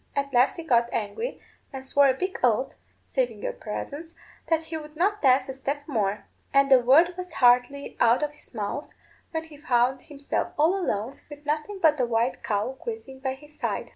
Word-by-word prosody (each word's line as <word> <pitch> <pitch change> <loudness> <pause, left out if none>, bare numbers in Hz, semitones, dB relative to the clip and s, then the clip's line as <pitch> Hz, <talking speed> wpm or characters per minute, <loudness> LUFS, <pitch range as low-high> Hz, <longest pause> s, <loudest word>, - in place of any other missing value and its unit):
At 280 -1 -2
last 250 +2 +4
he 335 - -6
got 240 -5 +2
angry, 230 - -3 0.3
and 265 -2 -7
swore 280 +1 +4
a 260 - +3
big 370 +6 -3
oath, 250 +2 +2 0.3
saving - - -2
your - - -2
presence, 325 - -6 0.3
that 325 -1 +2
he 320 0 -6
would 300 0 -10
not 405 +6 +1
dance 260 -1 +4
a 265 - -4
step 280 +2 -4
more; 210 -7 -1 0.3
and 275 0 +4
the 260 - +9
word 295 +9 +5
was 360 0 -7
hardly 250 +3 +3
out 235 +4 +4
of 295 - -1
his 295 - -13
mouth 215 +7 -4 0.3
when 320 -1 -3
he 315 -2 -13
found 255 -3 +1
himself 285 -1 -3
all 320 +5 +4
alone, 250 - -2
with 295 0 -11
nothing 305 +7 -2
but 315 -5 +4
a 250 - +3
white 235 +2 0
cow 210 +5 -1
grazing 445 - -6
by 265 -1 -2
his 295 +2 -16
side." - - -2
280 Hz, 200 wpm, -26 LUFS, 250-320 Hz, 0.3 s, the